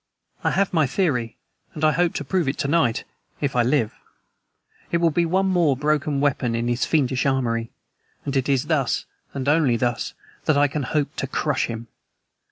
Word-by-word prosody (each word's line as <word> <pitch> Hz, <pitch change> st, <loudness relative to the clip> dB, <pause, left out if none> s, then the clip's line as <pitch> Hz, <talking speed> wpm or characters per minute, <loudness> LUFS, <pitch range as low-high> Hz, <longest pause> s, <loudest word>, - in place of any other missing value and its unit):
I -, -, +3 dB
have 195 Hz, -1 st, +1 dB
my 160 Hz, -5 st, +3 dB
theory 125 Hz, -7 st, 0 dB, 0.4 s
and 155 Hz, -, -5 dB
I 155 Hz, -, +5 dB
hope 170 Hz, +3 st, +1 dB
to -, -, -2 dB
prove 170 Hz, +2 st, 0 dB
it 135 Hz, -, -1 dB
to 140 Hz, -, -1 dB
night, 140 Hz, -7 st, +2 dB, 0.4 s
if 140 Hz, -3 st, -1 dB
I 125 Hz, -, +4 dB
live. 120 Hz, -2 st, +1 dB, 1.0 s
It 170 Hz, -, +3 dB
will 170 Hz, -1 st, +3 dB
be 170 Hz, +2 st, +1 dB
one 190 Hz, +3 st, +2 dB
more 175 Hz, -8 st, +2 dB
broken 150 Hz, 0 st, 0 dB
weapon 130 Hz, -4 st, +1 dB
in 115 Hz, +1 st, -1 dB
his 120 Hz, +1 st, +1 dB
fiendish 135 Hz, -4 st, +1 dB
armory, 115 Hz, -4 st, 0 dB, 0.6 s
and 140 Hz, -1 st, -2 dB
it 135 Hz, 0 st, +1 dB
is 135 Hz, 0 st, +2 dB
thus, 145 Hz, -6 st, 0 dB, 0.3 s
and 135 Hz, -2 st, -3 dB
thus 145 Hz, -, +4 dB
only, 135 Hz, -8 st, +2 dB
that 120 Hz, +4 st, -2 dB
I 145 Hz, 0 st, +5 dB
can 145 Hz, +1 st, -3 dB
hope 145 Hz, +2 st, -1 dB
to 135 Hz, -, -2 dB
crush 145 Hz, +1 st, 0 dB
him. 115 Hz, 0 st, -6 dB
140 Hz, 190 wpm, -23 LUFS, 125-155 Hz, 1.0 s, I